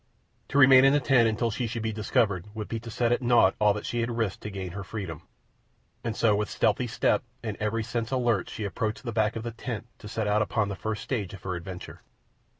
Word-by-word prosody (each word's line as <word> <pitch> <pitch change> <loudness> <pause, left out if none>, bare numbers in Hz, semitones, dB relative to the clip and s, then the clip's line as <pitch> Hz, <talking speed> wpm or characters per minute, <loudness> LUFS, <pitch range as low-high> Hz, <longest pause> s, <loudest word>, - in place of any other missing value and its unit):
To 140 - -1
remain 130 -1 +8
in 135 0 +6
the 145 - +4
tent 125 -4 +4
until 115 +1 0
she 120 +2 -2
should 115 0 -4
be 110 -1 -1
discovered 105 -3 +1
would 110 -1 -4
be 115 - -3
to 115 +1 -9
set 120 +1 0
at 120 - +2
naught 120 -6 +5
all 105 -1 +5
that 105 - -5
she 120 - -2
had 115 +1 0
risked 110 -5 -1
to 105 - -5
gain 95 -3 -5
her 100 +2 -6
freedom, 95 -7 -6 0.8
and 115 -2 -2
so 110 -3 +3
with 105 0 -1
stealthy 110 +4 +1
step 115 - +1 0.2
and 110 -3 -3
every 105 +1 -1
sense 115 0 -3
alert 120 -6 +1
she 110 - -5
approached 105 +4 -2
the 120 - -3
back 110 -1 +1
of 115 - -4
the 120 - -4
tent 115 0 -5
to 105 - -9
set 110 +1 -2
out 105 +1 +2
upon 110 -1 0
the 100 - -3
first 110 +2 -4
stage 105 -8 -3
of 95 - -14
her 95 - -2
adventure. 90 +1 -7
110 Hz, 245 wpm, -27 LUFS, 105-120 Hz, 0.8 s, remain